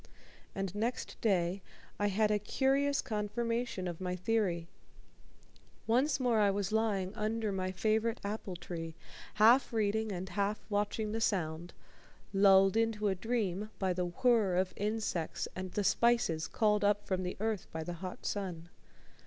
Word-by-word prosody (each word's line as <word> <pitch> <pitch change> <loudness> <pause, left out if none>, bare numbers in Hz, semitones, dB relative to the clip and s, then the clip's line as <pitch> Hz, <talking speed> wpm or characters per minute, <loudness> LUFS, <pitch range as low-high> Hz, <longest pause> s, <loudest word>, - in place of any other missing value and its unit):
And 195 -2 -3
next 225 +4 -3
day 190 -3 +1 0.4
I 205 - +2
had 210 +2 +2
a 210 - +2
curious 275 +6 +1
confirmation 230 -2 -2
of 175 0 -5
my 180 -1 -2
theory. 180 -3 0 1.2
Once 260 +6 +2
more 245 -4 +2
I 205 -1 +4
was 195 -1 -1
lying 210 -4 0
under 215 0 -1
my 185 -1 -2
favorite 220 +4 0
apple 200 -2 -4
tree, 165 -2 -6 0.4
half 230 +6 +5
reading 220 -1 0
and 185 0 -4
half 200 +3 -1
watching 210 +1 0
the 225 +1 -2
Sound, 175 -5 -1 0.6
lulled 195 0 +6
into 225 -2 +1
a - - +2
dream 210 -1 -2
by 190 -2 0
the 180 0 -1
whir 210 0 +2
of 185 +1 +1
insects 205 -6 -2
and 185 -1 -5
the 205 - 0
spices 215 -8 +2
called 210 -1 +2
up 205 0 +2
from 185 -1 -1
the 180 0 -4
earth 215 -2 -2
by 160 0 -4
the 175 - -5
hot 185 -1 -7
sun. 175 -4 -3
205 Hz, 155 wpm, -33 LUFS, 185-225 Hz, 1.2 s, lulled